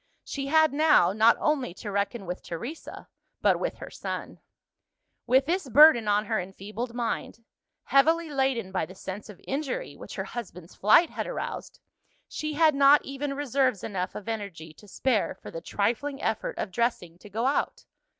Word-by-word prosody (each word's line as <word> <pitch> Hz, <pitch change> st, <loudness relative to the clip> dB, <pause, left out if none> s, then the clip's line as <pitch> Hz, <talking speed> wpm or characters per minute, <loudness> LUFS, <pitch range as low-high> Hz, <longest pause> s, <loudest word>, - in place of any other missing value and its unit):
She 275 Hz, -1 st, -5 dB
had 315 Hz, 0 st, +4 dB
now, 295 Hz, -, +4 dB
not 220 Hz, +2 st, +5 dB
only 275 Hz, -, 0 dB
to 205 Hz, -, -7 dB
reckon 200 Hz, +1 st, -2 dB
with 180 Hz, +1 st, -5 dB
Teresa, 235 Hz, -, -7 dB, 0.3 s
but -, -, +3 dB
with -, -, -2 dB
her -, -, -9 dB
son. -, -, -6 dB, 0.9 s
With 260 Hz, +2 st, +4 dB
this 345 Hz, -2 st, -1 dB
burden 255 Hz, -3 st, +7 dB
on 205 Hz, +1 st, +2 dB
her 220 Hz, 0 st, 0 dB
enfeebled 210 Hz, +6 st, -6 dB
mind 230 Hz, -1 st, -3 dB, 0.4 s
heavily 325 Hz, +4 st, +3 dB
laden 265 Hz, -8 st, 0 dB
by 185 Hz, -4 st, -1 dB
the 185 Hz, -, -12 dB
sense 195 Hz, +3 st, -7 dB
of 205 Hz, -, -11 dB
injury 305 Hz, -, -3 dB
which -, -, -10 dB
her -, -, -3 dB
husband's 180 Hz, -7 st, -8 dB
flight 220 Hz, -, +5 dB
had -, -, -4 dB
aroused -, -, -6 dB, 0.5 s
she 305 Hz, 0 st, -4 dB
had 315 Hz, 0 st, +5 dB
not 280 Hz, +1 st, +5 dB
even 275 Hz, +1 st, -4 dB
reserves 265 Hz, -5 st, 0 dB
enough 185 Hz, -3 st, -3 dB
of 210 Hz, -, -8 dB
energy 195 Hz, -8 st, -5 dB
to 210 Hz, -, -17 dB
spare 225 Hz, +2 st, 0 dB
for -, -, -11 dB
the 165 Hz, -, -6 dB
trifling 240 Hz, +10 st, -1 dB
effort -, -, -2 dB
of 195 Hz, -, -3 dB
dressing 180 Hz, -6 st, -2 dB
to 210 Hz, -, -13 dB
go 225 Hz, +5 st, -2 dB
out. 275 Hz, +2 st, -1 dB
235 Hz, 170 wpm, -27 LUFS, 200-280 Hz, 0.9 s, burden